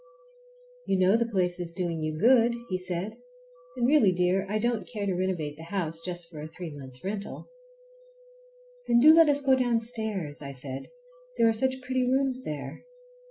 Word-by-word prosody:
"You 195 - +2
know 185 +2 +4
the 235 0 +1
place 180 -4 0
is 170 -1 -4
doing 170 -3 -3
you 155 0 -2
good," 235 +4 +4
he 185 -1 -1
said, 185 +4 -4 0.6
"and 240 - +1
really, 260 -9 +5
dear, 180 +2 +1
I 210 - 0
don't 235 0 -1
care 210 -4 -3
to 195 - 0
renovate 175 -5 -2
the 160 - -10
house 165 -3 -3
just 175 -1 -4
for 160 -3 -10
a 155 - -6
three 170 +1 -8
months' 130 -3 -11
rental." 200 - -5 1.4
"Then 235 - +5
do 305 +5 +8
let 325 -1 +7
us 285 0 +2
go 270 -1 +4
downstairs," 225 - -2
I 140 -1 -7
said, 130 0 -5 0.5
"there 230 - +5
are 225 - +4
such 260 +3 -1
pretty 255 0 0
rooms 260 0 0
there." 140 - -6
190 Hz, 180 wpm, -28 LUFS, 165-235 Hz, 1.4 s, do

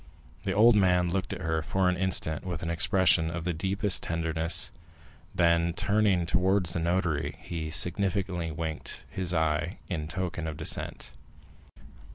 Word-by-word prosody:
The - - 0
old 115 +3 +6
man 90 -3 +3
looked 95 +1 -2
at - - -5
her 80 0 0
for 95 +4 0
an 90 - +2
instant 90 -4 0
with 90 -3 -4
an 85 - -2
expression 85 -2 +3
of 85 0 -4
the 90 +1 -1
deepest 95 +4 0
tenderness, 80 0 0 0.6
then, 85 0 +3
turning 100 -2 +2
towards 90 0 +2
the - - -1
notary, 85 -3 -1
he 80 -2 -5
significantly 90 +1 -1
winked 80 -1 -5
his 90 -2 -1
eye 80 +1 0
in 80 -5 -3
token 85 -1 -3
of 75 -2 -5
dissent. 70 -5 -2
85 Hz, 150 wpm, -28 LUFS, 80-95 Hz, 0.6 s, old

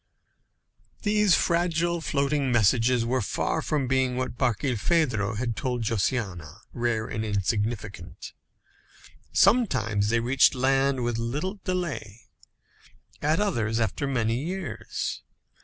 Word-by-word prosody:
These 210 -2 +4
fragile 170 0 +1
floating 140 -2 0
messages 120 +1 +3
were 130 +2 0
far 100 - -1
from 145 -4 -1
being 130 -1 +1
what 130 -2 -3
Barkilphedro 120 - 0
had 115 -1 -2
told 125 -3 -2
Josiana, 100 - -2
rare 120 -2 -1
and 110 -1 -4
insignificant. 105 -2 -3 1.0
Some 230 - +5
times 110 - -1
they 115 +1 +2
reached 125 +4 +4
land 135 0 +2
with 120 -1 -1
little 150 - -3
delay; 170 - -3 1.0
at 155 +4 +2
others, 115 - 0
after 115 +6 -1
many 120 -1 0
years. 185 +2 -4
125 Hz, 110 wpm, -26 LUFS, 110-150 Hz, 1.0 s, Some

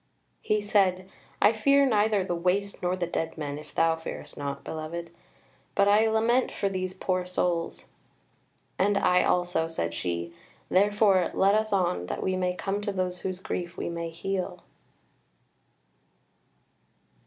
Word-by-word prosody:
He 215 0 +1
said: 190 -3 +2 0.3
"I 210 - +5
fear 275 +6 +4
neither 210 -4 +2
the 180 - -2
Waste 185 +4 -1
nor 180 +1 0
the 180 -1 -2
dead 165 -1 -3
men 145 -1 -4
if 150 0 -14
thou 165 0 +3
fearest 165 0 -8
not, 140 -1 -5
beloved: 165 +2 -5 0.6
but 200 - +4
I 210 +2 +5
lament 225 +3 +2
for 200 - -1
these 185 -1 -3
poor 185 -1 -1
souls." 175 -2 -1 0.9
"And 200 +1 +3
I 180 -1 +4
also," 175 -2 +1
said 85 - -3
she; 85 0 -3 0.4
"therefore 200 -1 +4
let 195 +1 +4
us 215 0 +1
on, 175 - +1
that - - -3
we 185 - 0
may 180 -1 0
come 195 +2 -2
to 205 - -2
those 185 -2 -2
whose 185 -1 -4
grief 175 -2 -4
we - - -3
may 170 0 -4
heal." 185 +3 -4
185 Hz, 150 wpm, -27 LUFS, 170-205 Hz, 0.9 s, I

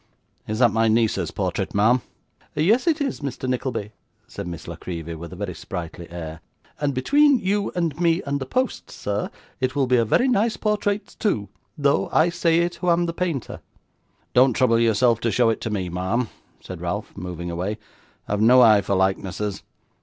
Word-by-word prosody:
'Is 110 - -2
that 120 -2 +5
my 115 +1 +2
niece's 110 0 +2
portrait, - - -3
ma'am?' 115 +5 +4 0.5
'Yes 215 - +3
it 325 -1 +3
is, 275 -3 -1
Mr. 135 -2 -4
Nickleby,' 125 -4 -2 0.4
said - - -7
Miss 85 -2 -7
La - - -5
Creevy, 85 -2 -6
with 85 +1 -8
a - - -8
very 95 -1 -4
sprightly 85 -1 -7
air, 80 -1 -7 0.4
'and 145 -2 0
between 285 - +4
you 200 -1 0
and 170 -2 -1
me 170 +1 +2
and 140 0 -1
the 130 - -5
post, 255 - -1
sir, 105 0 -3 0.3
it 130 +1 -1
will 140 -2 +2
be 125 0 +3
a 115 - +4
very 180 - +2
nice 230 -2 +2
portrait 210 -1 -1
too, 105 - 0 0.3
though 140 -1 +2
I 160 +2 +4
say 170 -1 +2
it 175 0 0
who 180 - -1
am 170 0 +3
the 170 - -3
painter.' 170 -7 -3 0.7
'Don't 130 0 +5
trouble 115 -1 +3
yourself 115 0 +3
to 115 - 0
show 115 +3 +3
it 110 - -4
to - - -3
me, 100 -4 -2
ma'am,' 95 +7 -1 0.4
cried - - -7
Ralph, - - -4
moving 85 -1 -5
away, 95 +5 -3 0.5
'I - - -6
have 105 0 0
no 125 +4 +7
eye 110 -3 +6
for 100 - -1
likenesses. 95 +1 -1
120 Hz, 190 wpm, -23 LUFS, 100-170 Hz, 0.7 s, no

